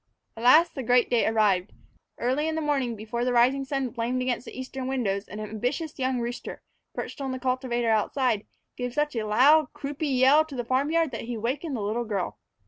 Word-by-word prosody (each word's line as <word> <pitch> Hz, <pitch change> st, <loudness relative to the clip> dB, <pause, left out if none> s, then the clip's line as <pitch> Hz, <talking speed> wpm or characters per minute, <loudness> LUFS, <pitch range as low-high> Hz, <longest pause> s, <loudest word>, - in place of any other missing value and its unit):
At 225 Hz, -, -9 dB
last 310 Hz, +8 st, +6 dB
the 270 Hz, -, -4 dB
great 245 Hz, 0 st, +3 dB
day 240 Hz, -2 st, +3 dB
arrived. 210 Hz, -4 st, +2 dB, 0.4 s
Early 260 Hz, +6 st, 0 dB
in 320 Hz, -, -1 dB
the -, -, -1 dB
morning, 275 Hz, -6 st, 0 dB
before 220 Hz, +3 st, -4 dB
the 250 Hz, 0 st, 0 dB
rising 260 Hz, +3 st, +3 dB
sun 270 Hz, -2 st, -2 dB
flamed 245 Hz, +1 st, -1 dB
against 250 Hz, -1 st, -2 dB
the -, -, -9 dB
eastern 260 Hz, 0 st, -5 dB
windows, 215 Hz, -7 st, -1 dB
an 210 Hz, -, -8 dB
ambitious 245 Hz, +9 st, -3 dB
young 260 Hz, -1 st, 0 dB
rooster, 240 Hz, +1 st, -5 dB, 0.3 s
perched -, -, -6 dB
on 270 Hz, -1 st, -2 dB
the -, -, -3 dB
cultivator 250 Hz, -2 st, 0 dB
outside, 220 Hz, 0 st, +1 dB, 0.3 s
gave 245 Hz, 0 st, -4 dB
such 295 Hz, -2 st, 0 dB
a 220 Hz, -2 st, -2 dB
loud, 275 Hz, +7 st, +5 dB
croupy 280 Hz, -2 st, -1 dB
call 290 Hz, +4 st, +6 dB
to 300 Hz, -3 st, -9 dB
the 245 Hz, -2 st, -3 dB
farm 260 Hz, +4 st, +1 dB
yard 330 Hz, -2 st, +1 dB
that 230 Hz, -, -5 dB
he 240 Hz, 0 st, -4 dB
awakened 260 Hz, +7 st, -2 dB
the 225 Hz, -, -3 dB
little 220 Hz, +4 st, -1 dB
girl. 200 Hz, -5 st, -3 dB
250 Hz, 210 wpm, -26 LUFS, 230-275 Hz, 0.4 s, last